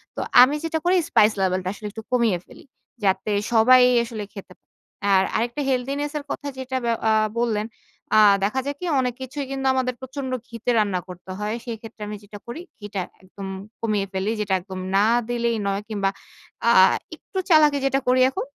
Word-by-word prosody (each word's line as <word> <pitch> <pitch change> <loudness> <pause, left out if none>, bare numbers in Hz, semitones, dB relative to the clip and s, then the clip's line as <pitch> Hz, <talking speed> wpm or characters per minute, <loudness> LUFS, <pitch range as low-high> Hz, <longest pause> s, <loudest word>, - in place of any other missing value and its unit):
তো - - -3 0.2
আমি 270 +4 +6
যেটা 325 0 -1
করি 360 +1 +4
স্পাইস 210 +1 +5
লেভেল 185 0 +1
টা - - 0
আসলে 210 +1 -7
একটু 220 +2 -8
কমিয়ে 235 -7 +2
ফেলি। - - -16 0.4
যাতে 195 +2 +1 0.2
সবাই 250 +3 +7 0.2
আসলে 225 -2 -6
খেতে 195 -2 -10 0.6
আর 190 0 +5
আরেকটা 240 +5 -1
হেলথিনেস 275 +3 -1
এর 295 - -5
কথা 285 - -4
যেটা 260 0 -3
ব্যা 235 - +1 0.2
আ - - +4 0.3
বললেন। 220 -3 0 0.5
আ 215 - +7 0.2
দেখা 215 +7 +1
যাক 285 0 -3
কি 360 - -5
অনেক 250 -1 0
কিছুই 275 +2 -5
কিন্তু 270 0 -2
আমাদের 255 -1 0
প্রচন্ড 260 0 -5 0.2
ঘিতে 230 +1 -5
রান্না 200 -4 +1
করতে 180 +1 -10
হয়। 210 +1 -2
সেক্ষেত্রে 225 -2 -8
আমি 210 - -5
যেটা 205 0 -11
করি 240 +8 -6 0.2
ঘিটা 205 -2 -4 0.2
একদম 195 +1 -9 0.3
কমিয়ে 210 -3 0
ফেলি। 190 +3 -1
যেটা 205 -2 -1
একদম 185 +1 -8 0.2
না 200 +2 +5 0.2
দিলেই 235 -1 0
নয় 200 0 -1
কিংবা 200 -3 0 0.6
আ - - +6 0.4
একটু - - -11
চালাকি 305 -3 +6
যেটা 270 0 +2
করি 255 +1 +4
এখন। 265 - -4
230 Hz, 185 wpm, -23 LUFS, 205-260 Hz, 0.6 s, সবাই